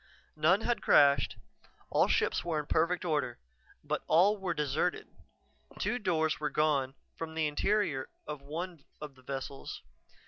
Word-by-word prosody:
None 165 +7 +3
had 240 +1 0
crashed; 140 -1 +4 0.5
all - - +4
ships - - +1
were 170 -2 -1
in 150 - -4
perfect 170 +4 +1
order. 150 -7 -1 0.5
But - - -2
all 185 +6 +5
were 185 -3 -2
deserted. 150 +4 -1 0.7
Two 245 - -1
doors 160 -6 0
were 150 0 -1
gone 140 -3 +1 0.2
from 160 -1 -6
the 160 -1 +1
interior 150 -2 0 0.2
of 150 -2 -6
one 165 +2 -6 0.2
of 150 -2 -7
the 130 - -20
vessels. 135 +1 -6
155 Hz, 145 wpm, -31 LUFS, 145-175 Hz, 0.7 s, all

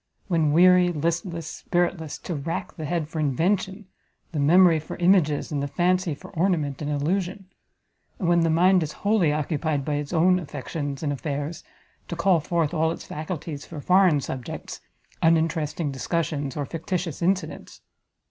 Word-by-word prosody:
when 165 -5 +2
weary, 180 +2 +6
listless, 170 +1 -2
spiritless, 175 -1 -2
to 175 - -6
rack 160 +2 -4
the 155 - -5
head 165 0 -1
for 160 0 -5
invention, 190 - 0 0.5
the 155 - -3
memory 165 +3 +5
for 155 - -7
images, 175 -6 +2
and 145 -2 -1
the 140 - -1
fancy 180 +2 +1
for - - -13
ornament 160 -6 0
and 145 - -3
illusion; 180 +7 -1 0.7
and 185 - -2
when 170 0 +4
the 165 -1 +2
mind 180 +3 +4
is 150 -2 -3
wholly 200 -7 +3
occupied 150 -1 -1
by 150 - -1
its 145 0 -3
own 180 +2 +4
affections 145 -3 -5
and 145 -2 0
affairs, 145 +4 -4 0.4
to 170 - -4
call 175 0 +3
forth 165 0 -1
all 160 -1 +2
its - - -7
faculties 155 -2 -5
for 160 - -8
foreign 180 -1 +4
subjects, 130 -2 -6 0.4
uninteresting 160 -2 +1
discussions, 145 0 -2
or 145 - -1
fictitious 165 +2 -4
incidents! 185 +2 -2
165 Hz, 155 wpm, -25 LUFS, 150-180 Hz, 0.7 s, weary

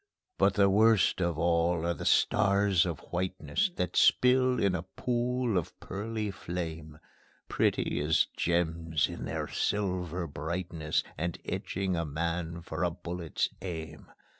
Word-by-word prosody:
But - - +4
the 100 -1 +5
worst 105 -1 +4
of 85 -3 0
all 85 0 +2
are 85 - +1
the - - -7
stars 100 -3 +3
of 80 -5 -4
whiteness, 95 - -1
That 90 - -2
spill 125 0 +4
in 100 -2 +2
a 90 - -1
pool 120 +3 -1
of 80 - -9
pearly 105 +1 -4
flame, 80 -4 -6 0.5
Pretty - - +1
as - - +3
gems 80 -3 0
in - - -6
their - - -3
silver 90 -4 -1
brightness, 80 +1 -2 0.2
And 85 +1 -2
etching 95 -1 -2
a 85 - 0
man 85 +2 -3
for 80 0 -3
a 90 - +3
bullet's 85 0 -3
aim. 80 -4 -6
90 Hz, 140 wpm, -30 LUFS, 85-100 Hz, 0.5 s, the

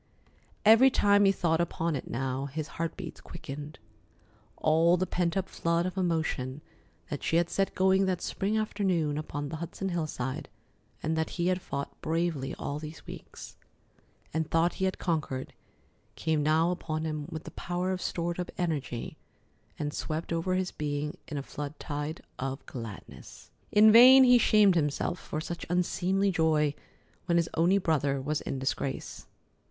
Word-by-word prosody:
Every 225 +5 +8
time 205 -4 +4
he 195 - +6
thought 170 -3 +1
upon 170 -1 -1
it 130 - -5
now 135 +2 -2
his 155 +2 -5
heart 165 0 -4
beats 175 -5 -8
quickened. 150 -2 -8 0.8
All 165 +3 +4
the 185 - 0
pent 175 -1 -1
up 190 - -1
flood 170 +1 0
of 185 - -3
emotion 160 -7 -1 0.5
that 145 - -3
she - - 0
had 170 0 +2
set 195 0 0
going 190 +1 +3
that 185 -2 0
spring 200 +4 -1
afternoon 185 -8 0
upon 145 -1 -4
the 160 - -5
Hudson 170 +4 -4
hillside, 155 -7 -3 0.5
and 160 +1 0
that 160 0 0
he 175 +1 +1
had 185 0 0
fought 140 -3 -5
bravely 160 -5 -1
all 145 +1 -4
these 155 0 -9
weeks, - - -10 0.8
and 160 0 -1
thought 165 +1 +2
he - - +3
had 190 - -1
conquered, 150 -6 -2 0.6
came 160 -2 0
now 160 +3 +3
upon 155 -3 -3
him 155 -2 -3
with 160 -2 -6
the - - -9
power 180 +1 -2
of 185 -1 -2
stored 170 0 -2
up 180 - -3
energy 145 -9 -3 0.6
and 145 -1 -3
swept 160 +2 -3
over 170 +3 0
his 185 -1 -1
being 150 0 -3
in 150 - -5
a 140 - -3
flood 145 +1 -6
tide 150 +2 -4 0.2
of 135 +1 -4
gladness. 115 -5 -9 0.2
In 215 +1 +7
vain 255 +4 +10
he 250 -1 +7
shamed 210 -3 +5
himself 165 +2 0
for 155 - -5
such 170 +2 -5
unseemly 185 +2 +1
joy 155 -4 +2 0.5
when 170 -1 +3
his 170 -1 +1
only 175 +4 +3
brother 145 -6 +1
was 150 +3 -2
in - - -4
disgrace. 135 0 -3
165 Hz, 165 wpm, -29 LUFS, 150-180 Hz, 0.8 s, vain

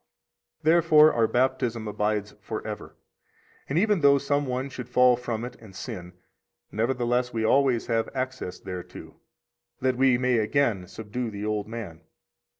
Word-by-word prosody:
77 160 +2 +5
Therefore 155 -2 +6
our 115 -1 +3
Baptism 120 -3 0
abides 105 0 -1
forever; - - -6 0.7
and 140 - 0
even 205 -1 +2
though 140 -1 +6
some 145 +1 0
one 130 +1 -2
should 125 -3 -8
fall 125 0 +5
from 120 -1 -4
it 125 0 -8
and 105 -4 -15
sin, 95 -4 -7 0.6
nevertheless 120 +2 0
we 115 -1 -2
always 130 -1 +3
have 115 -1 0
access 130 -8 -4
thereto, 90 -2 -9 0.6
that 130 -1 0
we 130 -1 +4
may 125 -1 +2
again 110 -5 +1
subdue 110 +4 -5
the 105 -1 -6
old 105 -1 -2
man. 105 -8 -7
120 Hz, 150 wpm, -26 LUFS, 110-130 Hz, 0.7 s, Therefore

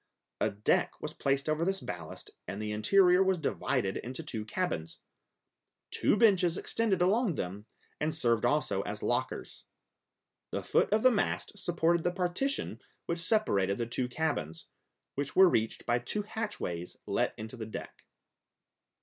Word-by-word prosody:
A - - +2
deck 105 +1 +1
was - - -5
placed 135 +1 0
over 155 +1 +1
this 195 +2 0
ballast, 85 - -7 0.2
and 100 - -5
the 105 0 -3
interior 180 - +5
was 190 -1 +3
divided 130 - -1
into 130 +6 -6
two 115 -8 -4
cabins; 110 - -2 0.9
two - - +2
benches 190 -6 +4
extended 200 -6 +1
along 205 - +2
them 100 +2 -5 0.3
and 155 +1 -1
served 120 -7 +1
also - - +1
as - - -5
lockers. - - -2 0.8
The - - -3
foot - - +2
of 215 +1 +3
the 255 - +7
mast 205 -1 -1
supported 170 -3 +1
the 175 - +1
partition 180 +10 -1 0.2
which 170 0 -2
separated 105 - +2
the 120 - -1
two 125 +2 -2
cabins, 85 - -2 0.5
which 140 0 -3
were 190 0 +8
reached 110 -9 0
by 120 +1 +2
two 205 - -3
hatchways 205 - -4
let - - 0
into 110 +3 -7
the 110 -3 -6
deck. 110 - -8
160 Hz, 150 wpm, -31 LUFS, -, 0.9 s, were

